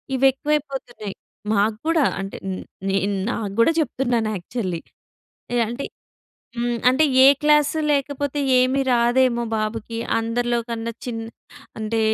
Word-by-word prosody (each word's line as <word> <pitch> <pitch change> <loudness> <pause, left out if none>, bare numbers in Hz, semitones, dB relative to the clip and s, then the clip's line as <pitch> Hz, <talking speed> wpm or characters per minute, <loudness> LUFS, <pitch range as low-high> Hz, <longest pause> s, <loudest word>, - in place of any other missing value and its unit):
ఇవి 265 - +2
ఎక్కువైపోతున్నాయి. 270 -7 -3 0.4
మాక్కూడా 225 +10 +2 0.2
అంటే 195 - -6 0.5
నేను, 195 +1 +1 0.2
నా - - 0 0.3
గూడా 230 - +6
చెప్తున్నాను 240 -6 0
యాక్చువల్లీ 180 -2 -4 0.8
ఎ - - +2
అంటే 240 +4 -4 0.7
హ్మ్. 240 0 -1
అంటే 260 +5 +4 0.2
ఏ - - +10 0.2
క్లాసు 300 +1 +4
లేకపోతే 285 0 -1 0.2
ఏమి 255 +2 +3
రాదేమో 240 0 +3
బాబుకి, 220 +1 -3 0.2
అందరిలో 240 +1 0
కన్నా 230 0 -3
చిన్న 230 -2 -3 0.6
అంటే 220 +1 -1
240 Hz, 115 wpm, -22 LUFS, 225-275 Hz, 0.8 s, ఏ